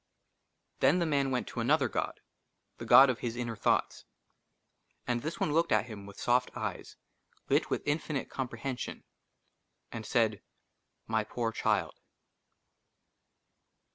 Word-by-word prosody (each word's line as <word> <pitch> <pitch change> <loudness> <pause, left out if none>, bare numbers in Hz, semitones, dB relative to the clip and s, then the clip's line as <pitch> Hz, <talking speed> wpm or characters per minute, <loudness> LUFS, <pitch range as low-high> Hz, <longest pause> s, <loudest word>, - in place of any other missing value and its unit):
THEN 165 - +4
THE 175 - +1
MAN 140 -3 +1
WENT 125 -2 -1
TO - - -6
ANOTHER 135 +3 +3
GOD, - - -3 0.6
THE - - -7
GOD 135 0 +8
OF 120 - -6
HIS 120 -1 -3
INNER 120 -2 -3
THOUGHTS. 105 - 0 1.0
AND 120 -1 -1
THIS 155 +5 -5
ONE 150 - 0
LOOKED 165 +2 +2
AT 110 -1 +3
HIM 105 -4 -9
WITH 100 - -12
SOFT 125 +1 +2
EYES - - -5 0.5
LIT - - +2
WITH - - -2
INFINITE 145 -1 -1
COMPREHENSION, 130 0 -5 0.9
AND 115 - -6
SAID, 110 -2 +1 0.3
*' - - -50
MY 110 -1 0
POOR 115 +1 -2
CHILD - - 0
125 Hz, 140 wpm, -31 LUFS, 115-140 Hz, 1.0 s, GOD